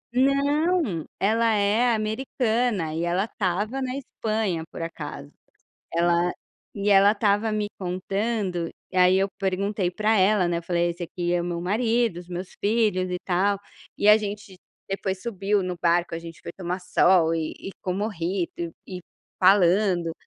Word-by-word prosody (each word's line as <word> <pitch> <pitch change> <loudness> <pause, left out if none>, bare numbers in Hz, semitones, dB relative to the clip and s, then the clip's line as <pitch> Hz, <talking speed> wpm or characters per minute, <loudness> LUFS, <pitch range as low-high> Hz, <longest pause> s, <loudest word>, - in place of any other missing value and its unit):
Não, 280 - +2
ela 225 +2 +2
é 210 +4 +3
americana 220 - -1
e 160 - -2
ela 175 +3 +1
estava 210 +5 -2
na 255 0 -3
Espanha 215 -9 -2
por - - -8
acaso, 150 -3 -7 0.6
ela 175 +1 +2 0.4
e 200 0 -2
ela 200 +1 +6
estava 210 +1 +1
me 210 -1 0
contando. 185 -1 -2 0.2
Aí 185 0 +5
eu 195 +1 +1
perguntei 195 0 -1
para 215 +4 +1
ela, 190 -1 +3
né, 170 - 0
eu - - -7
falei: 170 0 0
"Esse 175 +1 -5
aqui 175 +1 -2
é 175 - +1
meu 170 -1 -3
marido, 225 +2 +1
os 175 0 -11
meus 180 +1 -5
filhos 205 -4 +1
e 180 - -2
tal". 195 +2 +2 0.4
E 205 - +3
a 210 - +9
gente 205 -2 -6 0.3
depois 195 -1 -3
subiu 205 -2 0
no 180 -1 -3
barco, 170 0 +2
a - - -3
gente 165 0 -10
foi - - -7
tomar 180 0 -3
sol 175 -2 +3
e 160 -1 -2
e - - -6
com 185 - -1
mojito 180 -3 -3
e 185 -1 -7 0.4
falando. 185 -2 +4
195 Hz, 155 wpm, -25 LUFS, 175-215 Hz, 0.6 s, a